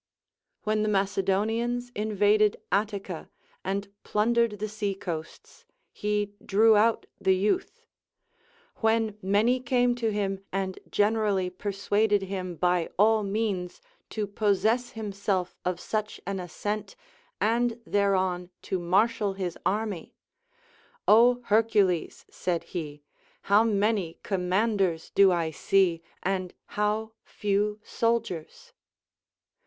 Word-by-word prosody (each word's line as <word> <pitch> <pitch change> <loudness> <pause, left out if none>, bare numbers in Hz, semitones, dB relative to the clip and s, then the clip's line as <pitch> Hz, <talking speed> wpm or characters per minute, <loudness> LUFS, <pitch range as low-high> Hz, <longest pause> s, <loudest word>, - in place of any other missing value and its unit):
When 215 0 +1
the 215 - +1
Macedonians 210 +5 0
invaded 210 0 +2
Attica 200 -4 -2 0.3
and 200 +1 -3
plundeied 230 0 +1
the 215 +2 -3
seacoasts, 195 -6 -5 0.3
he 210 -1 -1
drew 220 +2 +5
out 220 +2 +3
the 190 - +3
youth. 210 - -1 0.9
When 220 -1 +1
many 210 +6 +2
came 245 -1 +2
to 225 -2 0
him 195 -2 -2
and 190 -1 -2
generally 205 -3 +1
persuaded 205 +2 0
him 185 -2 -4
by 180 0 +1
all 215 +2 +5
means 200 -3 -2 0.3
to 215 -1 -2
possess 215 +4 +1
himself 200 -4 -2
of 180 -1 -1
such 215 +1 -3
an 195 0 -3
ascent, 205 - -4 0.4
and 235 +1 +1
thereon 190 -4 +1
to 190 - -2
marshal 200 +4 +2
his 185 -3 -4
army, 205 -3 -2 0.9
Ο 245 +3 +6
Hercules! 210 -5 +2
said 175 -2 -2
he, 150 -4 -6 0.4
how 205 +2 +5
many 205 -5 0
commanders 190 -2 0
do 195 -1 +6
I 165 -2 0
see, 175 +1 +2 0.2
and 185 -1 -2
how 210 +1 -1
few 210 +1 -1
soldiers 230 - -2
205 Hz, 105 wpm, -27 LUFS, 190-220 Hz, 0.9 s, Ο